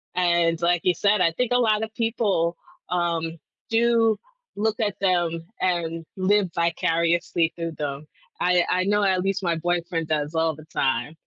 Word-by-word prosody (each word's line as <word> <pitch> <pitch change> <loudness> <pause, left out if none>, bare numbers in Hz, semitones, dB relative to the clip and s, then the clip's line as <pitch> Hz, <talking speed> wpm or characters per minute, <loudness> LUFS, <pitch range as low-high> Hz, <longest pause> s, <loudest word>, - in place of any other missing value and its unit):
and 170 -2 +2
like 175 0 +2
you 180 - +3
said, 200 0 +2
I 165 - +4
think 245 +8 -2
a - - +4
lot 220 -3 +2
of 220 0 -6
people, 210 -8 0 0.3
um, 170 -2 -1 0.3
do 230 -1 +3 0.4
look 215 +2 -1
at 210 -3 0
them 170 -3 +1 0.2
and 165 -2 -1
live 190 0 +2
vicariously 170 0 +1
through 165 -1 -4
them, 145 0 -4 0.3
I 180 -1 +3
I 185 0 +2
know 205 +1 +2
at 190 -2 +2
least 195 0 -1
my 170 -2 +1
boyfriend 170 -1 -1
does 150 0 -1
all 160 -1 +1
the 155 0 -13
time. 130 -1 -1
175 Hz, 165 wpm, -24 LUFS, 165-200 Hz, 0.4 s, I